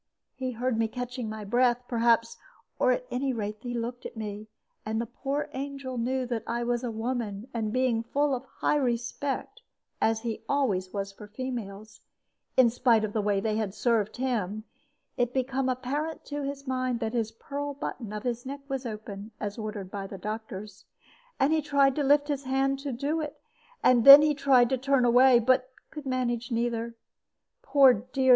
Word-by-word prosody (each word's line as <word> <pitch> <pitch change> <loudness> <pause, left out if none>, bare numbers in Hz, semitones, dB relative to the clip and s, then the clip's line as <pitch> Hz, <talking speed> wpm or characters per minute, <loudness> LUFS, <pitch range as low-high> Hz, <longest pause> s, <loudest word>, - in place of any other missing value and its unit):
He 255 -1 -4
heard 240 0 -1
me 225 - +2
catching 245 0 -5
my 215 -1 -6
breath, 245 +3 +2
perhaps, 230 -1 +2 0.4
or - - +4
at - - -1
any 265 +1 0
rate 210 -2 -4
he 245 0 -4
looked 240 +1 -4
at - - -8
me; 210 0 -5 0.4
and 220 +1 -2
the 235 - -1
poor 275 +5 -3
angel 270 -2 -5
knew 255 +2 0
that 240 -2 -2
I 235 +1 -1
was 240 +1 -1
a 245 - -2
woman; 225 -2 -3
and 220 -2 -2
being 250 -2 +1
full 285 +4 0
of 255 -1 -2
high 295 - 0
respect, 265 - -2 0.4
as 225 0 +2
he 230 -1 -4
always 200 -10 +1
was 200 -1 -3
for 205 +1 -12
females 215 -4 -6 0.6
in 250 -3 +6
spite 235 -2 +3
of 210 -1 -2
the 220 - +1
way 205 -1 +1
they 215 +1 -1
had 210 -3 -2
served 225 -3 +1
him 215 -5 -1 0.5
it 245 0 0
became 260 0 0
apparent 285 +5 -3
to 290 0 -4
his 275 0 -5
mind 255 -2 -1
that 225 -2 -2
the 225 -2 -1
pearl 285 0 -4
button 240 -5 -5
of 210 0 -5
his 245 -1 -2
neck 280 +2 -6
was 270 -2 -3
open, 210 -1 -7
as 205 +2 -4
ordered 210 -3 -5
by 195 -1 -5
the 195 - -8
doctors. 210 -1 -6 0.5
And 280 +4 +3
he 315 - +2
tried 280 -2 +3
to 295 - +1
lift 290 +1 +4
his 285 -2 -2
hand 270 +1 +1
to 280 0 -4
do 285 +6 -1
it; 300 -2 -6 0.4
and 245 -2 +5
then 275 +3 +12
he 305 0 +3
tried 265 -4 +4
to 260 -1 0
turn 270 -1 +2
away, 245 +1 +6
but 255 +2 +2 0.2
could 300 -3 -8
not 255 -1 0
manage 240 0 -2
either. 235 0 -1 0.7
Poor 280 - +6
dear! 255 +4 -1
245 Hz, 190 wpm, -28 LUFS, 220-270 Hz, 0.7 s, then